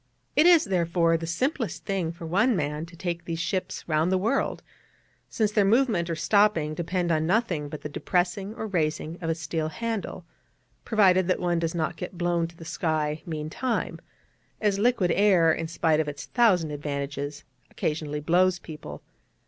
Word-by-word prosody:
It 310 Hz, -, +6 dB
is, 345 Hz, -3 st, +7 dB
therefore, 170 Hz, -3 st, +2 dB
the 165 Hz, 0 st, -3 dB
simplest 250 Hz, -, -2 dB
thing 185 Hz, -5 st, -1 dB
for 170 Hz, 0 st, -9 dB
one 200 Hz, +9 st, +2 dB
man 150 Hz, 0 st, -2 dB
to 170 Hz, -, -14 dB
take 170 Hz, -1 st, -4 dB
these 165 Hz, -1 st, -3 dB
ships 185 Hz, +2 st, -3 dB
round 160 Hz, +2 st, +1 dB
the 190 Hz, -, +3 dB
world, 225 Hz, +9 st, 0 dB, 0.7 s
since 215 Hz, -2 st, 0 dB
their 210 Hz, -1 st, +3 dB
movement, 210 Hz, -5 st, +2 dB
or 165 Hz, -, -1 dB
stopping, 170 Hz, -3 st, +2 dB
depend 175 Hz, +2 st, -1 dB
upon 160 Hz, 0 st, +1 dB
nothing 180 Hz, -8 st, 0 dB
but 150 Hz, -, -7 dB
the -, -, -4 dB
depressing 185 Hz, +6 st, -1 dB
or 220 Hz, -, -4 dB
raising 165 Hz, -3 st, -2 dB
of 165 Hz, -, -2 dB
a 165 Hz, -, +1 dB
steel 160 Hz, -1 st, -3 dB
handle, 220 Hz, -2 st, -4 dB, 0.6 s
provided 185 Hz, -4 st, +4 dB
that 185 Hz, -, +1 dB
one 175 Hz, -1 st, +1 dB
does 165 Hz, 0 st, -2 dB
not 160 Hz, 0 st, -1 dB
get 180 Hz, +2 st, -7 dB
blown 175 Hz, -1 st, +1 dB
to 170 Hz, 0 st, -16 dB
the 165 Hz, -, -10 dB
sky 155 Hz, -2 st, -1 dB
meantime, 160 Hz, +10 st, -2 dB, 0.6 s
as 205 Hz, -2 st, +1 dB
liquid 210 Hz, -6 st, +2 dB
air, 180 Hz, -5 st, +4 dB
in 165 Hz, -, -3 dB
spite 160 Hz, -1 st, +1 dB
of 155 Hz, -, 0 dB
its 145 Hz, -1 st, -6 dB
thousand 185 Hz, -10 st, +3 dB
advantages, 145 Hz, 0 st, -4 dB, 0.3 s
occasionally 150 Hz, -1 st, -3 dB
blows 180 Hz, +4 st, +3 dB
people. 150 Hz, -, -9 dB
170 Hz, 175 wpm, -26 LUFS, 155-195 Hz, 0.7 s, is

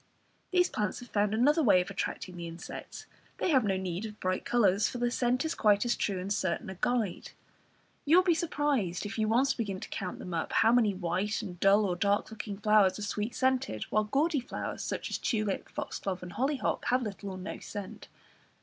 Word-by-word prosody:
These 360 Hz, -1 st, +3 dB
plants 210 Hz, -2 st, -2 dB
have 245 Hz, -, -11 dB
found 205 Hz, 0 st, +1 dB
another 285 Hz, +9 st, +3 dB
way 210 Hz, -9 st, +5 dB
of 180 Hz, +2 st, -3 dB
attracting 185 Hz, -1 st, -4 dB
the 170 Hz, -1 st, -6 dB
insects; 170 Hz, +1 st, -8 dB, 0.3 s
they 360 Hz, -, 0 dB
have 265 Hz, -5 st, +4 dB
no 195 Hz, -2 st, +1 dB
need 185 Hz, 0 st, -3 dB
of 210 Hz, 0 st, -12 dB
bright 185 Hz, 0 st, -1 dB
colours, 205 Hz, -4 st, +3 dB
for -, -, -5 dB
their 240 Hz, 0 st, 0 dB
scent 250 Hz, +3 st, +1 dB
is 320 Hz, -, 0 dB
quite 210 Hz, +1 st, +3 dB
as 240 Hz, -, +2 dB
true 200 Hz, -3 st, -1 dB
and 195 Hz, +3 st, -2 dB
certain 190 Hz, -2 st, -2 dB
a 190 Hz, -, -9 dB
guide. 235 Hz, -7 st, -1 dB, 0.7 s
You 300 Hz, +3 st, +4 dB
will 365 Hz, -, +6 dB
be 355 Hz, -2 st, +4 dB
surprised 290 Hz, -, 0 dB
if 205 Hz, +2 st, -5 dB
you 215 Hz, -, +2 dB
once 250 Hz, +5 st, +3 dB
begin 200 Hz, -5 st, -3 dB
to -, -, -8 dB
count 185 Hz, -2 st, -4 dB
them 180 Hz, -, -7 dB
up, 165 Hz, -, -2 dB
how 225 Hz, -, +5 dB
many 225 Hz, -5 st, +3 dB
white 185 Hz, +5 st, -1 dB
and 180 Hz, -4 st, -7 dB
dull 200 Hz, +2 st, +5 dB
or 180 Hz, -2 st, 0 dB
dark 200 Hz, +4 st, +1 dB
looking 210 Hz, -2 st, -6 dB
flowers 210 Hz, -2 st, +4 dB
are 210 Hz, -, -5 dB
sweet 210 Hz, +3 st, -3 dB
scented, 260 Hz, -, 0 dB
while 215 Hz, 0 st, +2 dB
gaudy 290 Hz, +7 st, +1 dB
flowers, 250 Hz, -, -5 dB
such -, -, -4 dB
as -, -, -2 dB
tulip, 215 Hz, -5 st, -1 dB
foxglove 185 Hz, -2 st, -4 dB
and 175 Hz, -1 st, -8 dB
hollyhock, 270 Hz, +2 st, -1 dB
have 250 Hz, +1 st, +2 dB
little 200 Hz, -2 st, -5 dB
or 190 Hz, -, -6 dB
no 185 Hz, +2 st, -6 dB
scent. 205 Hz, -3 st, -8 dB
210 Hz, 215 wpm, -30 LUFS, 190-245 Hz, 0.7 s, will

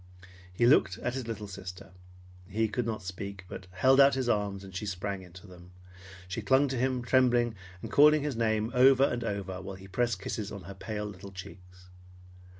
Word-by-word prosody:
He 90 Hz, +6 st, +1 dB
looked 120 Hz, -7 st, +4 dB
at 120 Hz, -, -3 dB
his 130 Hz, -3 st, -4 dB
little 110 Hz, -2 st, -5 dB
sister. 90 Hz, -2 st, -9 dB, 0.6 s
He 110 Hz, +4 st, 0 dB
could 120 Hz, +2 st, -2 dB
not 110 Hz, -3 st, -3 dB
speak, 95 Hz, +1 st, -7 dB
but 95 Hz, -, -9 dB
held 130 Hz, +9 st, +3 dB
out 140 Hz, 0 st, +7 dB
his 130 Hz, -2 st, -1 dB
arms, 100 Hz, -3 st, 0 dB
and 95 Hz, -1 st, -11 dB
she 105 Hz, +2 st, -4 dB
sprang 100 Hz, +1 st, -3 dB
into 95 Hz, +2 st, -13 dB
them. 90 Hz, -1 st, -14 dB, 0.5 s
She 95 Hz, +5 st, -4 dB
clung 130 Hz, +7 st, +3 dB
to 130 Hz, -, -2 dB
him 130 Hz, 0 st, 0 dB
trembling, 120 Hz, -2 st, +3 dB, 0.3 s
and -, -, -6 dB
calling 150 Hz, 0 st, +6 dB
his 145 Hz, -4 st, -2 dB
name 110 Hz, 0 st, 0 dB
over 130 Hz, +1 st, +6 dB
and 120 Hz, -3 st, +1 dB
over 100 Hz, -4 st, -4 dB
while 95 Hz, +1 st, -7 dB
he 95 Hz, 0 st, -12 dB
pressed 115 Hz, 0 st, 0 dB
kisses 105 Hz, +1 st, -4 dB
on 100 Hz, -3 st, -8 dB
her 100 Hz, +3 st, -8 dB
pale 105 Hz, +2 st, -5 dB
little 100 Hz, -1 st, -9 dB
cheeks. 90 Hz, -1 st, -12 dB
105 Hz, 195 wpm, -29 LUFS, 95-120 Hz, 0.6 s, out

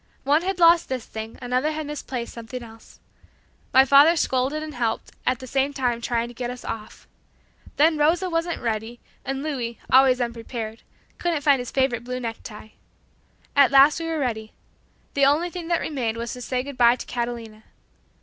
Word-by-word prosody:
One 290 Hz, +4 st, +3 dB
had 380 Hz, +1 st, -2 dB
lost 335 Hz, -1 st, +5 dB
this 255 Hz, -3 st, -3 dB
thing, 220 Hz, 0 st, -8 dB
another 255 Hz, +5 st, 0 dB
had 310 Hz, 0 st, -4 dB
misplaced 270 Hz, -5 st, -5 dB
something 235 Hz, +2 st, -7 dB
else. 225 Hz, -1 st, -15 dB, 0.7 s
My 265 Hz, +1 st, +6 dB
father 280 Hz, +5 st, +7 dB
scolded 275 Hz, 0 st, 0 dB
and 310 Hz, -1 st, -7 dB
helped, 230 Hz, -3 st, -2 dB, 0.2 s
at 255 Hz, -, +2 dB
the 260 Hz, -, -10 dB
same 270 Hz, +2 st, 0 dB
time 245 Hz, -4 st, -1 dB
trying 235 Hz, 0 st, -1 dB
to 240 Hz, -, -11 dB
get 240 Hz, 0 st, -4 dB
us 250 Hz, 0 st, -8 dB
off. 215 Hz, -1 st, -7 dB, 0.7 s
Then 310 Hz, +1 st, +4 dB
Rosa 335 Hz, +5 st, +2 dB
wasn't 335 Hz, -2 st, -2 dB
ready 225 Hz, +1 st, -3 dB, 0.2 s
and 270 Hz, +1 st, -3 dB
Louis, 245 Hz, -7 st, -3 dB
always 260 Hz, -1 st, +6 dB
unprepared, 230 Hz, -1 st, -5 dB, 0.4 s
couldn't 340 Hz, -4 st, -1 dB
find 280 Hz, -2 st, +4 dB
his 245 Hz, -, -5 dB
favorite 260 Hz, -3 st, 0 dB
blue 250 Hz, +1 st, -4 dB
necktie. 225 Hz, -2 st, -7 dB, 0.9 s
At 280 Hz, -2 st, +6 dB
last 275 Hz, +3 st, +6 dB
we 330 Hz, -, -4 dB
were 325 Hz, -1 st, -2 dB
ready. 220 Hz, -6 st, -3 dB, 0.6 s
The 280 Hz, -1 st, +4 dB
only 325 Hz, +5 st, +2 dB
thing 350 Hz, -2 st, -6 dB
that 340 Hz, -1 st, +1 dB
remained 240 Hz, -7 st, -2 dB
was 235 Hz, 0 st, -4 dB
to 250 Hz, -, -8 dB
say 250 Hz, +1 st, -2 dB
good 280 Hz, -2 st, -9 dB
bye 240 Hz, 0 st, +6 dB
to -, -, -8 dB
Catalina. 235 Hz, -3 st, -5 dB
255 Hz, 180 wpm, -24 LUFS, 235-295 Hz, 0.9 s, father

